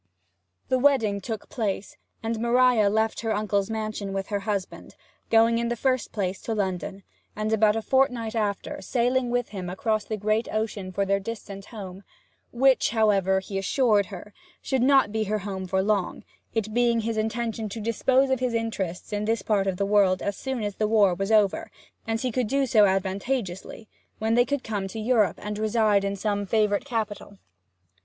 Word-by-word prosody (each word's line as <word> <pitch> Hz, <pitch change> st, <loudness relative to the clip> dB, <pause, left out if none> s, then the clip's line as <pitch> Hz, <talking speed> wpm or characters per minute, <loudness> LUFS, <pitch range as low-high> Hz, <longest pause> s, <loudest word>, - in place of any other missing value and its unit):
The 255 Hz, -, +2 dB
wedding 235 Hz, -8 st, +3 dB
took 220 Hz, +1 st, -5 dB
place, 205 Hz, -4 st, -3 dB, 0.3 s
and 225 Hz, 0 st, -2 dB
Maria 235 Hz, -2 st, +4 dB
left 220 Hz, +2 st, 0 dB
her 225 Hz, -1 st, -1 dB
uncle's 205 Hz, -1 st, 0 dB
mansion 215 Hz, -3 st, -3 dB
with 195 Hz, 0 st, -3 dB
her 205 Hz, -1 st, -1 dB
husband, 200 Hz, -2 st, -4 dB, 0.3 s
going 230 Hz, +1 st, +4 dB
in 235 Hz, -, -1 dB
the 240 Hz, -, -1 dB
first 255 Hz, 0 st, 0 dB
place 190 Hz, -2 st, -3 dB
to 225 Hz, -, -3 dB
London, 190 Hz, -1 st, -3 dB, 0.3 s
and 215 Hz, +1 st, -1 dB
about 215 Hz, -1 st, +4 dB
a 225 Hz, -, -2 dB
fortnight 250 Hz, -4 st, +1 dB
after 220 Hz, +6 st, -2 dB
sailing 250 Hz, +1 st, +1 dB
with 245 Hz, 0 st, -1 dB
him 185 Hz, -4 st, -5 dB
across 215 Hz, +3 st, -1 dB
the 215 Hz, -, -4 dB
great 215 Hz, +3 st, 0 dB
ocean 215 Hz, -3 st, -3 dB
for 195 Hz, +2 st, 0 dB
their 195 Hz, 0 st, +1 dB
distant 200 Hz, -2 st, -7 dB
home 195 Hz, -3 st, -9 dB, 0.5 s
which, 260 Hz, +2 st, +3 dB
however, 200 Hz, -4 st, +2 dB
he 195 Hz, 0 st, -4 dB
assured 210 Hz, -1 st, +2 dB
her, 200 Hz, +1 st, -10 dB, 0.3 s
should 265 Hz, -2 st, -1 dB
not 265 Hz, -4 st, +4 dB
be 220 Hz, 0 st, -1 dB
her 215 Hz, +1 st, 0 dB
home 190 Hz, -2 st, -5 dB
for 190 Hz, +1 st, +1 dB
long, 200 Hz, -3 st, -1 dB, 0.3 s
it 215 Hz, -1 st, -1 dB
being 235 Hz, -1 st, +2 dB
his 225 Hz, +1 st, -2 dB
intention 220 Hz, 0 st, -2 dB
to 225 Hz, -, -6 dB
dispose 260 Hz, +5 st, +2 dB
of 260 Hz, -, +2 dB
his 250 Hz, -2 st, -1 dB
interests 210 Hz, -5 st, -3 dB
in 205 Hz, 0 st, -1 dB
this 225 Hz, +1 st, 0 dB
part 200 Hz, -3 st, +1 dB
of 190 Hz, -2 st, -1 dB
the 200 Hz, -, 0 dB
world 195 Hz, -2 st, +3 dB
as 200 Hz, -, -1 dB
soon 265 Hz, -2 st, -4 dB
as 205 Hz, -1 st, -4 dB
the 215 Hz, -, +1 dB
war 210 Hz, -4 st, +4 dB
was 195 Hz, +4 st, -2 dB
over, 210 Hz, -3 st, +3 dB, 0.4 s
and 225 Hz, 0 st, -1 dB
he 255 Hz, -, -1 dB
could 250 Hz, 0 st, 0 dB
do 275 Hz, +4 st, +1 dB
so 220 Hz, -4 st, +5 dB
advantageously; 195 Hz, +2 st, -2 dB, 0.3 s
when 220 Hz, +1 st, 0 dB
they 245 Hz, +1 st, +4 dB
could 285 Hz, -1 st, -2 dB
come 205 Hz, -3 st, -3 dB
to 220 Hz, +3 st, -7 dB
Europe, 215 Hz, -5 st, +2 dB
and 210 Hz, 0 st, -4 dB
reside 215 Hz, -2 st, +2 dB
in 200 Hz, 0 st, -1 dB
some 205 Hz, 0 st, -1 dB
favourite 210 Hz, +1 st, +1 dB
capital. 215 Hz, -5 st, -4 dB
215 Hz, 190 wpm, -26 LUFS, 200-230 Hz, 0.5 s, so